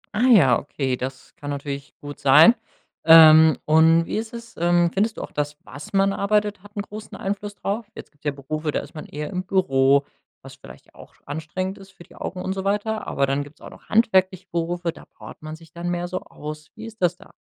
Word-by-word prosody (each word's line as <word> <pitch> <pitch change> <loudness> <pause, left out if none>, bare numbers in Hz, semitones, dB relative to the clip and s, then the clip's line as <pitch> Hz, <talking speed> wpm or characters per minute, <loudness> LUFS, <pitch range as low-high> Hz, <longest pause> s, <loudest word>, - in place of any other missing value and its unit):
Ah, 240 +4 +2
ja, 140 - +6
okay, 135 -2 -3
das 130 +1 -7
kann 145 - -7
natürlich 140 -1 -6
gut 145 0 -9
sein. 150 - +7 0.5
Ähm, 160 -1 +8
und 160 +2 +5
wie - - -3
ist 220 +1 -4
es? 235 -1 -10
Ähm, 175 0 +2
findest 215 +3 0
du - - -5
auch - - -8
das, 145 0 -3
was 140 +7 -10
man 195 0 +2
arbeitet, 210 0 0
hat 205 +2 -17
'n 200 - -1
großen 210 +1 -10
Einfluss 205 +1 -4
drauf? 205 +3 -4
Jetzt - - -11
gibt's 145 - -35
ja - - +2
Berufe, 150 +3 -5
da - - -1
ist - - -13
man 155 - -8
eher 150 +4 -6
im 185 -1 -3
Büro, 140 -7 +2 0.4
was - - -11
vielleicht 65 +3 -15
auch - - -16
anstrengend 175 +6 -5
ist 195 0 -14
für 175 - -15
die - - -20
Augen 180 +1 -6
und 190 - -2
so 190 0 -4
weiter. 210 +2 -1
Aber 140 - +1
dann 135 +1 -1
gibt's 145 +1 -16
auch - - -11
noch - - -17
handwerkliche 190 -4 +2
Berufe, 170 0 -2
da - - -15
powert - - -14
man 155 0 -7
sich 165 0 -17
dann 170 0 -4
mehr 175 0 -2
so 185 +1 -4
aus. 150 0 -9
Wie 220 - -9
ist 225 -2 -12
das 175 0 +1
da? - - -18
170 Hz, 225 wpm, -23 LUFS, 145-195 Hz, 0.5 s, Ähm